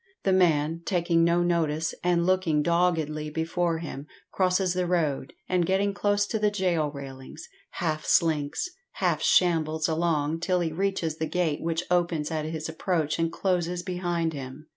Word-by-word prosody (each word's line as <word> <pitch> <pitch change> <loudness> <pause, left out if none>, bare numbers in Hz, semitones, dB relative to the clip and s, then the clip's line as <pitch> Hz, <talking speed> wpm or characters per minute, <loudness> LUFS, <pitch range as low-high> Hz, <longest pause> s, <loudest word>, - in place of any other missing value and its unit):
The 190 - +2
man, 165 -3 +2
taking 170 -2 +2
no 170 +1 +3
notice 160 -2 0
and 175 -1 +2
looking 180 -5 +2
doggedly 160 -3 +1
before 165 +2 -1
him, 150 -3 -7 0.2
crosses 185 -1 +1
the 180 -1 -1
road, 155 -5 0
and 180 -1 +2
getting 195 +3 +1
close 205 0 +1
to 220 +1 -2
the 210 0 +3
gaol 180 -7 0
railings, 140 +1 -9 0.3
half 155 -3 -2
slinks, 155 - +1 0.3
half - - 0
shambles 160 -3 +2
along 160 -1 0
till 180 +2 +1
he 165 -2 -1
reaches 170 -3 -1
the 160 - -2
gate 170 -5 0
which 165 +1 -1
opens 170 -3 +1
at 155 -1 -2
his 155 0 -4
approach 160 -1 -1
and 165 0 +1
closes 180 -1 -1
behind 175 -3 -1
him. 135 +2 -8
170 Hz, 160 wpm, -27 LUFS, 155-180 Hz, 0.3 s, no